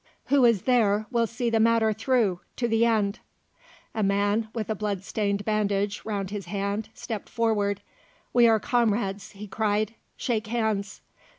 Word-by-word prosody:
Who 275 Hz, -3 st, +5 dB
is 230 Hz, -6 st, +3 dB
there 215 Hz, -4 st, +3 dB
will 235 Hz, -1 st, +2 dB
see 235 Hz, +1 st, -2 dB
the 225 Hz, -, +2 dB
matter 225 Hz, -1 st, +3 dB
through, 220 Hz, -5 st, +1 dB, 0.2 s
to 240 Hz, -, 0 dB
the 225 Hz, +1 st, +3 dB
end?" 210 Hz, -2 st, +1 dB, 0.7 s
A 220 Hz, -, -2 dB
man, 205 Hz, +2 st, +1 dB
with 220 Hz, -3 st, -4 dB
a -, -, +2 dB
bloodstained 200 Hz, 0 st, -2 dB
bandage 205 Hz, -1 st, 0 dB
round 200 Hz, -3 st, -3 dB
his 200 Hz, -4 st, -5 dB
head, 200 Hz, +3 st, -2 dB
stepped 220 Hz, -3 st, -6 dB
forward. 210 Hz, -4 st, 0 dB, 0.5 s
"We 240 Hz, -1 st, +6 dB
are 225 Hz, -1 st, +4 dB
comrades," 205 Hz, -4 st, 0 dB
he 205 Hz, +1 st, -8 dB
cried; 215 Hz, +1 st, 0 dB, 0.2 s
"shake 225 Hz, -3 st, -1 dB
hands." 215 Hz, -3 st, -1 dB
215 Hz, 155 wpm, -26 LUFS, 200-230 Hz, 0.7 s, We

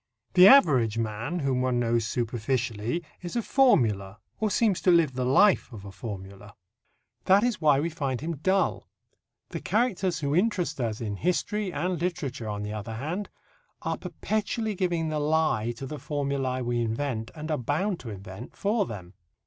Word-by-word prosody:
The 180 Hz, +1 st, +9 dB
average 130 Hz, -, +6 dB
man, 115 Hz, +8 st, -2 dB
whom 130 Hz, -2 st, 0 dB
one 125 Hz, -1 st, +1 dB
knows 115 Hz, -1 st, +1 dB
superficially, 120 Hz, +3 st, -2 dB, 0.2 s
is 175 Hz, +3 st, -6 dB
a 235 Hz, -, 0 dB
formula, 105 Hz, -, +2 dB, 0.2 s
or 215 Hz, -, +1 dB
seems 210 Hz, -2 st, +2 dB
to -, -, +2 dB
live 170 Hz, -6 st, +4 dB
the 125 Hz, 0 st, -2 dB
life 185 Hz, +5 st, +4 dB
of 105 Hz, -4 st, -10 dB
a 100 Hz, -, -8 dB
formula. 100 Hz, -1 st, -8 dB, 0.7 s
That 195 Hz, +3 st, +5 dB
is 240 Hz, -5 st, 0 dB
why 145 Hz, -3 st, +4 dB
we 165 Hz, +3 st, -1 dB
find 135 Hz, -5 st, -2 dB
him 160 Hz, +1 st, -4 dB
dull. 190 Hz, +6 st, 0 dB, 0.6 s
The -, -, -5 dB
characters 200 Hz, -7 st, 0 dB
who 145 Hz, -2 st, -1 dB
interest 180 Hz, -, 0 dB
us 110 Hz, -2 st, -2 dB
in 105 Hz, -3 st, -3 dB
history 185 Hz, -, -1 dB
and 175 Hz, +1 st, -2 dB
literature, 140 Hz, -10 st, -3 dB
on 105 Hz, 0 st, -3 dB
the 105 Hz, +1 st, -4 dB
other 110 Hz, +1 st, -5 dB
hand, 165 Hz, -, -4 dB, 0.5 s
are -, -, -1 dB
perpetually 215 Hz, +1 st, -2 dB
giving 175 Hz, -4 st, -1 dB
the 155 Hz, -1 st, -1 dB
lie 150 Hz, -7 st, +1 dB
to 135 Hz, -, -6 dB
the 150 Hz, +2 st, -6 dB
formulae 140 Hz, -2 st, -2 dB
we 120 Hz, 0 st, 0 dB
invent, 115 Hz, 0 st, -2 dB
and 155 Hz, 0 st, -5 dB
are 150 Hz, -, 0 dB
bound 165 Hz, -, -1 dB
to 120 Hz, -, -8 dB
invent, 100 Hz, -, -9 dB
for 205 Hz, 0 st, 0 dB
them. 95 Hz, -4 st, -8 dB
140 Hz, 175 wpm, -27 LUFS, 115-180 Hz, 0.7 s, The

